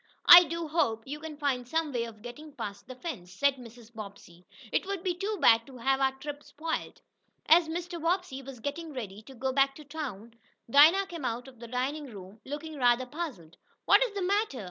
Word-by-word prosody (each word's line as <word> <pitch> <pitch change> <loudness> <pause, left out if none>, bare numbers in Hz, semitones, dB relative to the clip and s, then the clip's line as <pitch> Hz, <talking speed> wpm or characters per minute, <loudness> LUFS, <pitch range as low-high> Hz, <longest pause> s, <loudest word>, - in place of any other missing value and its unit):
"I 350 0 +11
do 335 0 -4
hope 230 -9 0
you 290 +3 -6
can 310 -1 -8
find 265 -4 -1
some 320 +1 -1
way 235 -1 -1
of 220 -2 -12
getting 295 +5 -10
past 205 -7 -7
the 255 - -8
fence," 250 - -7
said 275 +8 +1
Mrs. 235 -1 -13
Bobbsey. 200 -5 -11 0.2
"It - - 0
would 395 -3 -3
be 365 - 0
too 400 +4 -3
bad 230 0 +5
to 265 -2 -12
have 265 +3 +1
our 265 0 +3
trip 290 +2 -7
spoiled." 320 +3 -5 0.4
As 330 +1 +6
Mr. 345 +1 -5
Bobbsey 335 -5 -1
was 270 -2 -10
getting 300 +5 -5
ready 210 -6 -6
to 265 +4 -14
go 260 +2 -2
back 275 0 +3
to 305 - -11
town, 255 -8 -7 0.3
Dinah 310 +10 +6
came 340 -5 -8
out 245 +1 -3
of 255 -3 -15
the 235 - -9
dining 270 +5 -2
room, 200 -2 -11
looking 295 +2 -6
rather 245 -1 +3
puzzled. 250 - -7 0.3
"What 410 +4 +6
is 460 -5 -3
the 395 - -2
matter?" 400 - 0
275 Hz, 210 wpm, -29 LUFS, 235-320 Hz, 0.4 s, I